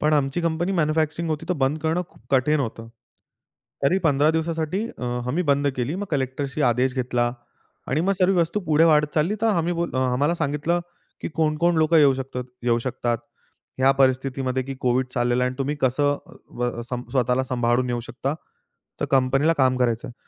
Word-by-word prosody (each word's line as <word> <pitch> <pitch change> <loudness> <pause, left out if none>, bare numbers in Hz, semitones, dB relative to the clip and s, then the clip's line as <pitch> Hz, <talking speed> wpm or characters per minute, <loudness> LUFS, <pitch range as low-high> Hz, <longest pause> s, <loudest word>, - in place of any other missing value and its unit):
पण 150 +1 +2
आमची 145 +2 +1
company 170 +2 0
manufacturing 160 -1 0
होती 155 +1 -3
तर - - +2
बंद 145 +4 0
करणं 160 +3 +1
खूप - - -23
कठीण 140 +3 +3
होतं. 115 -3 -5 0.9
तरी 170 +8 +3
15 145 0 +4
दिवसासाठी 160 +5 -1
अ, - - -5 0.2
आम्ही 150 +8 0
बंद 140 0 +2
केली. 130 +5 -2
मग 200 +2 -4
कलेक्टरचा 140 0 -1
आदेश 125 +2 +1
घेतला 120 -1 0 0.6
आणि 140 +5 +1
मग 190 +4 +2
सर्व 185 0 +3
वस्तू 170 +5 0
पुढे 160 -3 +3
वाढत 150 -2 +3
चालली 165 +6 +1
तर - - +4
आम्ही 170 +1 0
बोललो 170 -5 -2
अ, 130 -1 +1
आम्हाला 145 +7 +1
सांगितलं 155 +2 0 0.4
की - - -3
कोण-कोण 160 +2 +1
लोकं 160 +1 +3
येऊ 145 -3 +6
शकतं 130 -1 -5 0.2
येऊ 120 -1 +2
शकतात 120 -1 -2 0.6
ह्या 130 +1 +5
परिस्थितीमध्ये 130 0 +1
की 135 +1 -6
कोव्हिड 125 +1 +1
चाललेला 120 0 +1
आहे - - +1
आणि 130 - -10
तुम्ही 140 +2 -1
कसं 135 +3 +2 0.2
अ, - - -16
अ, - - -13 0.2
व 120 -1 -2
स्वतःला 125 0 0
सांभाळून 125 0 0
येऊ 120 -1 -1
शकता, 130 +4 -4 0.7
तर - - +1
कंपनीला 135 +4 +3
काम 130 -1 +3
करायचं 120 -2 0
आहे. 120 - -11
140 Hz, 185 wpm, -23 LUFS, 125-160 Hz, 0.9 s, येऊ